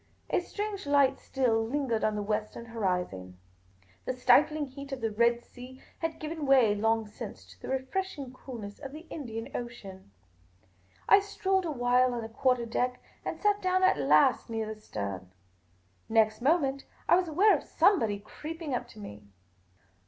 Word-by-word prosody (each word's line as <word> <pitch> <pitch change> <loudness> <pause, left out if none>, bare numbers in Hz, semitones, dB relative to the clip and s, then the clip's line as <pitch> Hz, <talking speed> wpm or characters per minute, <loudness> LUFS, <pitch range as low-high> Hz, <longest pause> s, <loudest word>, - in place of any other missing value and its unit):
A - - +3
strange 405 -1 -5
light 280 -2 +4
still 235 -4 +1
lingered 240 -2 -1
on 215 -1 +1
the 210 - -2
western 215 +2 -3
horizon. 180 - -3 0.7
The - - -1
stifling 290 +5 +4
heat 280 +1 -10
of 270 - -4
the 225 -2 -1
Red 235 +2 +2
Sea 255 +1 -12 0.2
had 325 -1 -2
given 310 -1 -4
way 255 -6 +5
long 225 +2 +1
since 210 - -9
to - - -18
the - - -7
refreshing 265 +1 -3
coolness 230 -6 -9
of 275 -1 -8
the 315 +3 -9
Indian 225 -6 -6
Ocean. 200 - -7 1.0
I 400 - +8
strolled 385 -2 0
a 325 - -2
while 250 -1 +2
on 235 - -3
the 225 - -6
quarter 250 +1 +1
deck, 250 +2 -1 0.2
and - - -4
sat 415 -1 +2
down 370 0 +2
at 370 - +4
last 150 - +4
near 225 -1 -2
the 215 - -17
stern. 95 - -5 0.8
Next 220 0 +3
moment, 275 -1 +2 0.2
I - - +6
was 360 0 +1
aware 385 +7 +5
of - - -3
somebody 225 - +3
creeping 305 +8 -7
up 245 - -2
to 215 - -14
me. 105 - -10
250 Hz, 165 wpm, -29 LUFS, 220-300 Hz, 1.0 s, I